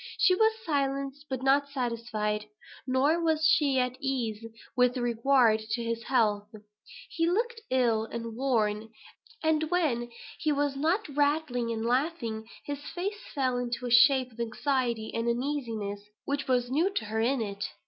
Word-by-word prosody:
She 370 - +5
was 440 +4 +4
silenced, 275 -1 -2
but 260 -1 -3
not 280 +1 +3
satisfied. 225 -5 -2 0.4
Nor 280 +6 +2
was 315 -1 +2
she 295 -4 +4
at 250 0 0
ease 235 -5 -2 0.3
with 250 0 +3
regard 240 -1 +3
to 225 +2 -3
his 230 0 -2
health. 210 -5 +1 0.6
He 330 0 0
looked 455 +5 -1
ill, 235 -4 +2
and 230 0 -6
worn; 225 -4 0 0.5
and, 315 -1 +1
when 285 -10 0 0.3
he 310 - +1
was 285 -1 0
not 330 +9 0
rattling 285 -4 0
and 225 0 -3
laughing, 240 -4 -1 0.2
his 285 -1 -4
face 385 +8 -5
fell 255 -3 +1
into 245 +1 -3
a 245 - -3
shape 255 +1 +5
of 230 - -18
anxiety 235 -1 -1
and 230 +1 -1
uneasiness, 235 -6 -2 0.2
which 280 0 -2
was 250 -1 +1
new 325 +8 +2
to 220 - -1
her 220 +1 -2
in 260 +3 +1
it. 200 -3 -4
255 Hz, 155 wpm, -29 LUFS, 230-290 Hz, 0.6 s, She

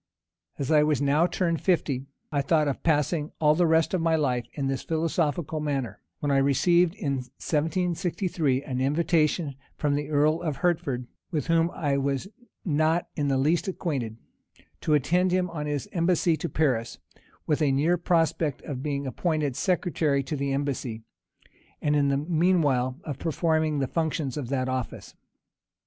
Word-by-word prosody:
As 140 +1 -2
I 150 -1 +6
was 150 -1 +2
now 145 +4 +3
turned 170 -3 0
of - - -20
fifty, 140 -7 0 0.2
I 145 -2 +1
thought 150 +1 +2
of 140 - -2
passing 150 0 +1
all 150 -1 +5
the 175 +2 +3
rest 160 +2 +3
of 185 - +1
my 165 0 +2
life 125 -6 0
in 140 - -3
this 135 -1 -1
philosophical 160 -1 -1
manner: 140 -5 -3 0.2
when 145 - 0
I 140 - +3
received, 170 +6 +3
in 140 -8 -2
1763, 160 +1 -1
an 130 -2 -3
invitation 155 +1 +1 0.2
from 145 -1 +1
the 145 +1 -2
earl 155 +2 +2
of 155 -4 -2
Hertford, 140 -8 -1 0.2
with 150 -6 -2
whom 165 0 +3
I 145 -5 -1
was 140 +4 -1 0.4
not 160 +1 +1
in 145 -2 0
the 135 -1 +2
least 160 +6 +1
acquainted, 135 - -3 0.6
to 155 - +2
attend 175 +7 +2
him 180 -1 +1
on 150 -3 -4
his 145 -2 -2
embassy 170 -1 +2
to 170 - -4
Paris, 125 -7 0 0.5
with 150 +1 0
a 145 -3 +3
near 150 +6 +3
prospect 165 -3 0
of 130 -4 -5
being 140 -1 -2
appointed 150 -1 -1
secretary 160 -6 +1
to 145 +4 -4
the 140 -1 -2
embassy; 135 -5 -2 0.8
and, 150 0 +1
in 145 -1 +3
the 140 0 +2
mean 170 +3 +2
while, 130 -1 0
of 145 -3 -5
performing 160 -1 +1
the 135 - +1
functions 160 -4 -1
of 140 -6 -4
that 130 -2 0
office. 130 -1 -4
150 Hz, 170 wpm, -26 LUFS, 140-165 Hz, 0.8 s, I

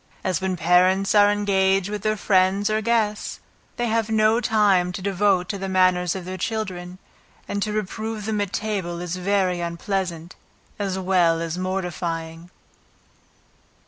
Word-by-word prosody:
As 185 -2 -1
when 185 -1 -1
parents 180 +4 +3
are 205 -1 +6
engaged 195 -2 +2
with 210 -1 -4
their 215 +1 0
friends 195 +1 +2
or 215 0 +1
guests, 220 -2 -1 0.4
they 240 - 0
have 225 -1 0
no 220 +1 +3
time 200 -6 +3
to 180 - -5
devote 190 -1 +1
to 200 - -3
the 195 0 -4
manners 185 -1 +2
of 185 -2 -6
their 185 +1 -6
children, 185 -4 -4 0.5
and 205 - -3
to 215 - -1
reprove 215 +1 -4
them 215 -1 -1
at 200 -2 -2
table 195 -6 -3
is 175 0 -4
very 185 -1 0
unpleasant, 170 0 -3 0.4
as 195 -2 -2
well 180 -3 +2
as 165 0 -3
mortifying. 170 -3 -4
190 Hz, 150 wpm, -23 LUFS, 180-210 Hz, 0.5 s, are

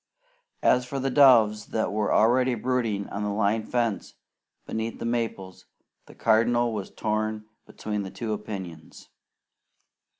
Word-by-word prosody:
As 125 - +4
for 135 +2 -5
the 135 0 -1
doves 115 -6 +5
that 110 - -1
were 105 0 -1
already 125 +3 +3
brooding 115 -4 -1
on 100 - -5
the 105 - -1
line 105 +1 0
fence 115 -3 -2 0.5
beneath 110 +1 -4
the - - -6
maples, 115 -6 -4 0.4
the - - -15
Cardinal 120 +1 +2
was 100 -3 -5
torn 110 0 -2 0.2
between 105 -3 -5
two 110 -2 -4
opinions. 95 -7 -8
110 Hz, 130 wpm, -26 LUFS, 105-120 Hz, 0.5 s, doves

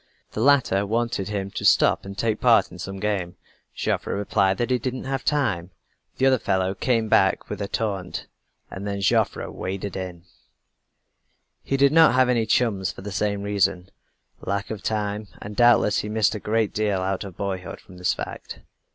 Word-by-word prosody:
The 110 - -4
latter 130 -7 +4
wanted 115 -1 -1
him 100 -2 -3
to - - -5
stop - - +4
and 100 0 -8
take 110 0 -1
part 120 -2 +4
in 90 - -11
some 95 +1 -6
game. 95 -4 -2 0.4
Joffre - - -1
replied 100 -1 +1
that 120 +4 -1
he 125 - +2
didn't 130 +2 -4
have 135 0 -3
time. 100 - 0 0.5
The 130 - +2
other 130 -2 +4
fellow 95 -2 0
came 115 +2 0
back 95 -2 +2
with 105 0 -4
a 100 - -2
taunt 100 -4 -3 0.5
and 100 +2 -6
then 100 -1 -3
Joseph 95 - +2
"waded 95 +2 -5
in." 90 -3 -6 1.4
He 135 - -1
did 140 0 +5
not 160 -4 +6
have 130 -1 +4
any 115 -3 +1
chums 105 -5 +1
for - - -12
the 105 - -6
same 100 +1 -1
reason, 100 -2 0 0.5
lack 100 +1 -3
of 105 -3 -5
time, 105 -1 -2
and 105 +1 -8
doubtless 120 -3 +4
he 105 - -4
missed 110 -1 +2
a 105 - -4
great 110 +1 0
deal 105 -3 0
out 95 0 -2
of 95 -3 -10
boyhood 95 -3 -4
from 95 -4 -15
this 90 - 0
fact. - - -7
100 Hz, 185 wpm, -24 LUFS, 95-115 Hz, 1.4 s, not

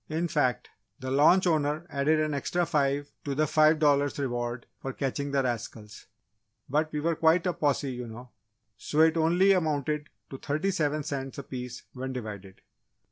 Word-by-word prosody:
In 160 +2 -1
fact, 145 -6 0 0.3
the 130 0 -5
launch 155 +7 +5
owner 155 -1 +1
added 150 +2 +2
an 155 -1 0
extra 175 +5 0
five 145 -1 0
to 140 -1 -3
the 155 +2 +2
five 155 +1 +4
dollars 145 -2 +2
reward 120 -3 -3 0.2
for 135 - -4
catching 140 +1 -2
the 140 -1 +1
rascals. 115 -3 -5 0.6
But 155 +3 0
we 150 - -2
were 165 +2 0
quite 165 +3 +3
a 180 - +1
posse, 145 -3 0
you 125 -1 -6
know, 120 +2 -10 0.5
so 150 - 0
it 160 0 +5
only 175 +4 +4
amounted 150 -4 0 0.2
to 135 - -7
thirty 155 +7 -1
seven 155 -4 0
cents 135 -1 -5
a 140 - -5
piece, 125 -2 -7
when 130 0 -5
divided." 100 -6 -7
145 Hz, 175 wpm, -28 LUFS, 130-155 Hz, 0.6 s, launch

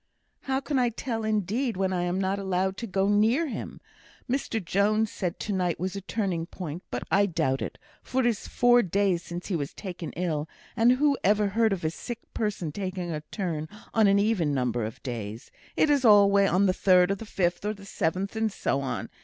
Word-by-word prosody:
"How 265 0 +1
can 275 0 -1
I 245 -1 +3
tell 230 -1 -4
indeed, 215 +3 0
when 190 -1 0
I'm 175 +1 0
not 195 +1 0
allowed 190 0 0
to 235 - -5
go 195 0 +1
near 220 +10 +3
him? - - -6 0.5
Mr 250 -3 -1
Jones 210 +4 +1
said 180 -3 -3
to 210 - -2
night 180 -3 0
was 185 +2 -3
a 200 - -4
turning 190 -5 -2
point; 175 -2 -6
but - - -3
I 200 +1 +4
doubt 135 -7 0
it, - - -5 0.2
for 260 - -1
it - - 0
is 230 -4 0
four 245 0 +4
days 195 -3 +1
since 175 +1 -7
he 190 - 0
was 145 -3 -3
taken 180 -5 -6
ill, 160 -2 -2 0.3
and 235 +1 +5
who 280 +1 +2
ever 205 +1 +3
heard 220 +2 +2
of 190 -4 -2
a 155 - +1
sick 240 +7 -6 0.2
person 200 -7 -2
taking 185 -1 -4
a 155 -1 -3
turn 160 -6 -3 0.2
on 220 -2 +5
an 200 0 +4
even 200 -8 +1
number 120 -3 0
of 110 - -8
days; 115 -3 -6 0.3
it's 290 -3 +3
always 200 -3 +6
on 190 +3 +3
the 185 - +3
third, 180 0 +4
or - - +1
the 200 - -9
fifth, 175 -5 -1
or 210 +1 -1
seventh, 190 +2 -2
or 220 0 +1
so 140 -8 -1
on. 135 - -3
195 Hz, 205 wpm, -27 LUFS, 175-220 Hz, 0.5 s, always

